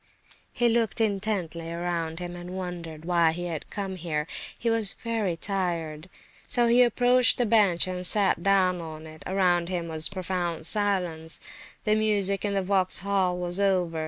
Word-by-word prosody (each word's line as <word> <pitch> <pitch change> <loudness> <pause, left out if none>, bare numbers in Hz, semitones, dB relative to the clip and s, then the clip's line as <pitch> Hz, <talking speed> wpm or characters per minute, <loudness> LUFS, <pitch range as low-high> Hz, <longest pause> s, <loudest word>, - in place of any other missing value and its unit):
He 240 - +1
looked 225 -4 +1
intently 195 -6 -2
around 170 -1 -3
him, 175 0 -5
and 175 +1 -7
wondered 170 -4 -7
why 170 -2 +3
he 175 +1 -5
had 165 -4 -5
come 195 -2 -5
here; 155 -3 -2 0.3
he 235 - -4
was 225 -3 +2
very 220 -7 -1
tired, 170 -4 -3 0.4
so 240 -1 +2
he 235 +1 +5
approached 245 +1 +4
the 245 - +1
bench 205 -6 +4
and 185 -1 -4
sat 195 -1 +4
down 185 -2 +2
on 160 -1 -8
it. 155 0 -12
Around 180 -2 +1
him 175 -2 -3
was 160 -1 +1
profound 180 -4 -3
silence; 180 -6 0 0.4
the 215 0 +2
music 205 -2 +1
in 200 -1 -1
the 195 - 0
Vauxhall 190 -1 0
was 175 +1 -2
over. 180 -5 +1
185 Hz, 160 wpm, -26 LUFS, 170-200 Hz, 0.4 s, he